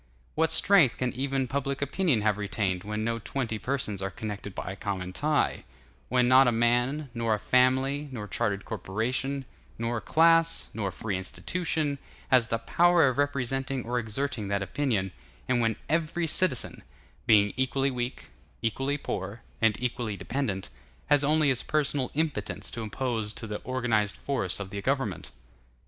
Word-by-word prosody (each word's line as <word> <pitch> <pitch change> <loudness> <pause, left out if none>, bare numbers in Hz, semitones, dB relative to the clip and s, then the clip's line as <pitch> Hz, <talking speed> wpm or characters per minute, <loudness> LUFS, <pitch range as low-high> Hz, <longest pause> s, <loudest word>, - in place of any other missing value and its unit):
What 160 0 +2
strength 170 -7 +5
can 125 -1 -1
even 135 0 -1
public 140 +1 -2
opinion 140 - +1
have 105 -1 +1
retained, 100 -3 -1
when 105 +1 -3
no 115 +1 -1
twenty 115 -2 -3
persons 115 -7 -2
are 95 - -1
connected 105 -1 -6
by 95 - -4
a - - -6
common 95 -3 -4
tie; 150 +7 +1 0.5
when 125 0 +3
not 130 +1 +7
a - - +4
man, 120 +5 +1
nor 115 -2 +1
a - - -3
family, 130 +5 +2
nor 105 -5 -5
chartered 100 -1 -1
corporation, 130 +7 -2 0.3
nor 115 0 -2
class, 165 +1 +3
nor 105 -3 -2
free 100 0 -3
institution, 150 - -2 0.3
has 125 -3 +5
the 115 - 0
power 170 +7 +4
of 130 +2 -3
representing 135 -2 -1
or 120 +1 0
exerting 120 0 -3
that 100 0 0
opinion; 95 -3 -1 0.4
and 125 -1 +2
when 115 -1 +1
every 165 +2 0
citizen—being 115 - +1
equally 135 +1 +1
weak, 125 0 -4 0.3
equally 135 +6 0
poor, 100 -4 -5 0.2
and 110 -2 +3
equally 120 -4 -2
dependent—has 95 - -2
only 150 0 +3
his 130 -3 +1
personal 145 -4 0
impotence 150 -9 -2
to 115 - -5
oppose 110 -1 -2
to - - -6
the 105 -1 -4
organized 115 -6 0
force 115 -11 -1
of 95 -1 -6
the 100 0 -4
government? 130 -5 -1
125 Hz, 155 wpm, -28 LUFS, 105-140 Hz, 0.5 s, not